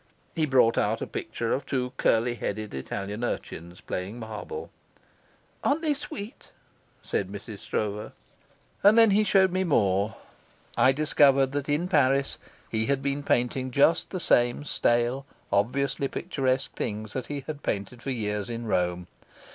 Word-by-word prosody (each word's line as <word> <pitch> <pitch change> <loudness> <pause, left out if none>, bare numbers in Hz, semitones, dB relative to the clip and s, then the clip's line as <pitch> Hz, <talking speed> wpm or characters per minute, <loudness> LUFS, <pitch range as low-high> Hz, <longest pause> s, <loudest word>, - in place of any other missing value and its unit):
He 155 -1 +1
brought 130 -4 +4
out - - 0
a - - -2
picture 115 - -3
of 140 - -1
two 125 -1 -1
curly 115 +2 +2
headed 110 -2 -4
Italian 100 - -4
urchins 85 -6 -5
playing 95 +5 -4
marbles. 120 - -6 0.9
"Aren't 300 +4 +1
they 305 -2 +3
sweet?" 225 -6 -8 0.5
said 95 -1 -2
Mrs. 100 +1 -8
Stroeve. 105 +1 -3 0.7
And 205 +3 +6
then 225 -2 +7
he 210 +2 +4
showed 190 -2 +4
me 185 +1 +1
more. 105 - +2 0.6
I 130 - +5
discovered 140 -2 +4
that 145 0 -3
in 150 +5 +1
Paris 140 -4 +2 0.3
he 110 0 -1
had 140 -1 0
been 140 +1 -1
painting 130 -1 0
just 140 +6 +3
the 185 - -4
same 120 -4 +2
stale, 120 0 +1 0.2
obviously 135 +7 +1
picturesque 135 -5 -1
things 105 0 -4
that 130 - -4
he 145 -1 -4
had 150 -1 -6
painted 105 +4 -3
for - - -5
years 105 -4 -2
in 115 0 -4
Rome. 90 -4 0
130 Hz, 150 wpm, -27 LUFS, 110-145 Hz, 0.9 s, then